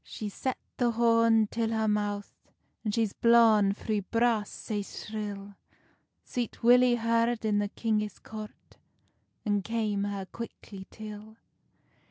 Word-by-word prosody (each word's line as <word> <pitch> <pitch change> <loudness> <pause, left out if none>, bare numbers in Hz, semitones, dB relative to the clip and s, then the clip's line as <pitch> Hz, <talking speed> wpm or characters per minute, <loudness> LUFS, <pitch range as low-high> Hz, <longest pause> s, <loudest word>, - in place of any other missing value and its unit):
She's 210 -2 -6
set 260 -1 -2 0.2
the 245 -1 +2
horn 230 -1 +4
till 225 +1 -2
her 220 -1 0
mouth, 205 -1 -1 0.5
And 215 - -1
she's 220 -2 0
blawn 225 -4 +5
three 210 +1 -2
blasts 230 +1 0
sae 210 -2 -3
shrill; 205 -1 -6 0.7
Sweet 240 -2 -4
Willy 245 +1 +6
heard 230 0 +2 0.2
i 215 - +1
the 205 0 +1
kingis 210 -1 -1
court, 215 -1 -10 0.7
And 205 -2 +1
came 215 -3 -1
her 200 -1 -4
quickly 200 -3 -9
till. 215 0 -10
215 Hz, 130 wpm, -29 LUFS, 205-230 Hz, 0.7 s, Willy